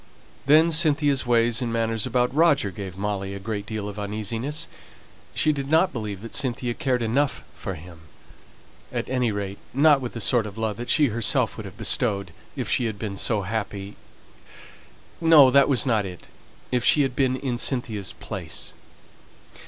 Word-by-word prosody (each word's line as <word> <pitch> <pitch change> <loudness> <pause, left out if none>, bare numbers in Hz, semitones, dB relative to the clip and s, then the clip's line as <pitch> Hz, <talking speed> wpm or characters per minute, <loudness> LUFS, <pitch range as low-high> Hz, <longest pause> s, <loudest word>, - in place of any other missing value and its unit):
Then 160 +3 +6
Cynthia's 145 -5 +2
ways 120 0 +3
and 120 -2 -2
manners 115 0 0
about 125 0 +1
Roger 145 -9 +3
gave 95 -1 -8
Molly 100 -1 -3
a - - -6
great 100 0 -5
deal 110 -2 -4
of 105 0 -7
uneasiness. 110 +8 -4 0.7
She 155 - +3
did 140 -1 -4
not 165 +4 +3
believe 105 -5 -5
that 115 - -9
Cynthia 125 -3 0
cared 130 -4 -1
enough 130 +4 0
for 95 - -6
him; 85 +1 -12 0.9
at - - -3
any 125 -3 +1
rate, 100 -1 -4 0.2
not 145 0 +5
with 125 - -5
the 115 - -5
sort 115 0 +3
of 100 +1 -10
love 110 -2 -2
that 120 - -6
she 150 -3 +4
herself 115 0 +1
would - - -7
have - - -12
bestowed, 100 -4 0 0.2
if - - -3
she 125 - +1
had 110 -2 -3
been 100 -2 -5
so 105 +1 0
happy 100 0 -4 1.3
no, 155 -5 +7
that 140 +2 +5
was 135 0 +2
not 110 -5 +2
it 90 -3 -9 0.4
if 125 -1 +1
she 145 - +5
had 130 -2 -2
been 130 -1 +2
in 130 -2 -3
Cynthia's 110 -8 -1
place. - - -7
115 Hz, 175 wpm, -24 LUFS, 105-135 Hz, 1.3 s, no